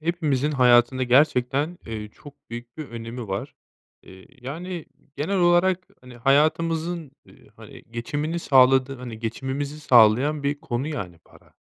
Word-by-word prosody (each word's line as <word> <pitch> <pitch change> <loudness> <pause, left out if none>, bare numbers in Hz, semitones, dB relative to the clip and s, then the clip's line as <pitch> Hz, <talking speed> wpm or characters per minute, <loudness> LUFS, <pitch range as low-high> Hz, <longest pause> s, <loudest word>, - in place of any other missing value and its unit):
hepimizin 155 -4 0
hayatında 125 -1 +4
gerçekten, 140 +4 +2
eee, 110 -2 -6
çok 145 +6 -15 0.2
büyük 120 0 -9
bir 155 -3 -7
önemi 115 0 -7
var. 95 +1 -4 0.5
Eee, 95 0 -15
yani 165 +6 -6 0.3
genel 180 +7 -1
olarak, 180 +1 +2
hani, 125 -1 -14
hayatımızın, 160 +4 +1
eee, - - -20
hani - - -13
geçimini 145 +8 -3
sağladığı 135 -2 +4
hani 120 -3 -8
geçimimizi 135 +6 -4
sağlayan 130 +3 +4
bir 145 +1 -2
konu 120 +2 -3
yani 95 - -6
para. - - -22
135 Hz, 135 wpm, -24 LUFS, 120-155 Hz, 0.5 s, hayatında